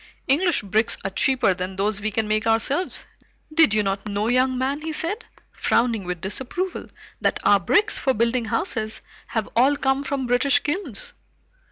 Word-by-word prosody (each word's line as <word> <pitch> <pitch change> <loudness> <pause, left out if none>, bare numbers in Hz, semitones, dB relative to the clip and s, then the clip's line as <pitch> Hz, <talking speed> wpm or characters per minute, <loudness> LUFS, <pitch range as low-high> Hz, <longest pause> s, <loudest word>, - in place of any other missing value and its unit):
English 325 - +2
bricks 215 +3 +2
are 195 - -3
cheaper 255 -1 +2
than 185 +1 -5
those 200 +1 -1
we 215 - -1
can 215 +1 -1
make 215 +1 0
ourselves. 265 +10 +1 0.5
Did 315 -10 +5
you 210 - +2
not 195 +1 -2
know, 210 +2 -1
young 255 +1 +2
man," 270 +3 -1
he 320 +1 -4
said, 370 +9 -2 0.3
frowning 230 -4 +1
with 180 -2 -4
disapproval, 265 - -4 0.3
"that - - +1
our 205 - +5
bricks 410 - +2
for 265 - +1
building 235 +2 +1
houses 220 - -1 0.3
have 220 -2 -2
all 265 +5 +4
come 270 -1 0
from 275 -1 -2
British 250 +3 +4
kilns?" 295 - -3
240 Hz, 170 wpm, -23 LUFS, 210-280 Hz, 0.5 s, Did